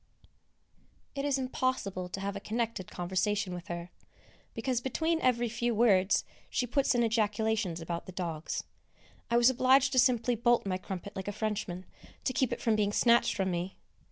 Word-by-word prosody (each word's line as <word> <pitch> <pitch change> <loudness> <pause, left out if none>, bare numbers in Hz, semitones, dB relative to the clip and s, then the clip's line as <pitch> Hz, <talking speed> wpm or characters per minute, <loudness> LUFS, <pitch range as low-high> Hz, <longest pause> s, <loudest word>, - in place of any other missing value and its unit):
It 275 0 -3
is 280 -2 +2
impossible 255 -8 -2
to 195 - -5
have 200 0 -3
a - - -3
connected 225 -3 -3
conversation 190 +2 -1
with 175 +2 -7
her, 175 -1 -6 0.6
because 245 +1 -1
between 320 +6 0
every 240 -1 +2
few 235 +1 -1
words 200 -4 +4 0.3
she 250 - 0
puts 265 +2 +1
in 240 - +3
ejaculations 220 -4 0
about 170 +2 -4
the - - -6
dogs. 170 -3 -4 0.7
I 235 - +3
was 240 +2 +6
obliged 260 +1 +4
to 260 - +3
simply 245 -1 +3
bolt 240 0 +2
my 185 -1 -1
crumpet 190 +2 -7
like 190 0 -5
a - - -1
Frenchman, 205 -3 -3 0.4
to 255 - 0
keep 260 -1 +1
it - - -3
from 225 -3 +2
being 205 -1 +1
snatched 235 +2 +4
from 190 -1 0
me. 175 +2 -3
220 Hz, 175 wpm, -30 LUFS, 190-245 Hz, 0.7 s, was